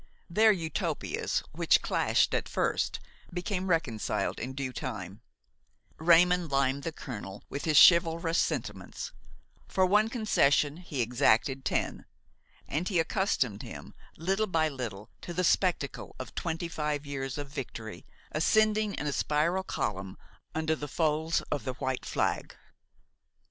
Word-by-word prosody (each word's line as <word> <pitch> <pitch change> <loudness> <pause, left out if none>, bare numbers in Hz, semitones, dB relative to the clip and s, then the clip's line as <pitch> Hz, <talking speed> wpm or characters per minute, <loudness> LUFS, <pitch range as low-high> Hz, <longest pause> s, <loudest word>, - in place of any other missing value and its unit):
Their 220 +5 +6
Utopias, 165 -5 -2
which - - +3
clashed - - +2
at - - -1
first, - - 0 0.3
became 180 +1 -2
reconciled 140 -11 0
in 130 +3 -4
due 130 -1 -4
time: 105 -6 -6 0.8
Raymon 175 +2 +5
limed 135 -1 +1
the 165 - -3
colonel 100 -10 -8
with 140 - -4
his 155 -3 +3
chivalrous 170 0 +6
sentiments; - - -3 0.6
for 190 - +2
one 210 +4 +3
concession 150 - +2
he 155 -8 -2
exacted 120 +3 +2
ten, - - -1 0.6
and 160 +6 -2
he 190 - 0
accustomed 160 - 0
him - - -9 0.2
little 195 +6 0
by 160 -4 +2
little 115 -7 -6
to 175 - -7
the 180 - +1
spectacle 175 -6 0
of 130 -3 -7
twenty 170 0 -3
five 150 -3 -2
years 135 -2 -4
of 145 -1 -5
victory 120 -6 -7 0.3
ascending 215 +5 +2
in - - -4
a 145 - -1
spiral 155 +7 +1
column 95 - -3 0.4
under 160 0 +1
the 150 -1 -6
folds 160 +2 +1
of 145 -5 -1
the 130 - -3
white 130 +1 -3
flag. - - -1
155 Hz, 135 wpm, -29 LUFS, 130-175 Hz, 0.8 s, Their